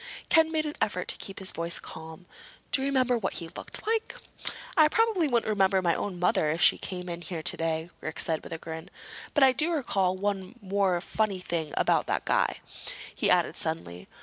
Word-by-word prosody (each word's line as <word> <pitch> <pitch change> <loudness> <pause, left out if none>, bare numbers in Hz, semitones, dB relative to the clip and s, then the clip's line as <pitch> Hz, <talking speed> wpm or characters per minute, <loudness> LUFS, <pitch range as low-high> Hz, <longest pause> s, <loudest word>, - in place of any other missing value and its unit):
Ken 320 -1 +5
made 310 -1 0
an 300 - -4
effort 180 -4 0
to - - +5
keep 195 - -7
his 190 - +3
voice 170 +1 -1
calm. 160 +2 -9 0.5
"Do 265 - +4
you 270 - 0
remember 255 -3 +2
what 190 - -2
he 165 -2 -3
looked - - -3
like?" 445 0 -1 0.6
"I 310 -4 +7
probably 435 -2 +2
wouldn't 240 -5 +1
remember 195 -2 +3
my 175 -2 +2
own 190 0 -3
mother 175 -3 +2
if 160 +2 -1
she - - +5
came 180 -1 -5
in 170 -1 -5
here 165 -1 -5
today," 165 -1 0
Rick 155 +1 -6
said 160 -1 +2
with - - -10
a 165 - -3
grin. 160 +2 -8 0.5
"But 295 - +5
I 265 - +7
do 310 +6 +1
recall 195 - 0
one 195 +1 -3
more 195 -3 +1
funny 215 0 -1
thing 170 -4 -3
about - - +2
that - - -1
guy," - - +1 0.5
he - - +1
added - - +3
suddenly. 85 +1 -3
190 Hz, 200 wpm, -28 LUFS, 170-255 Hz, 0.6 s, I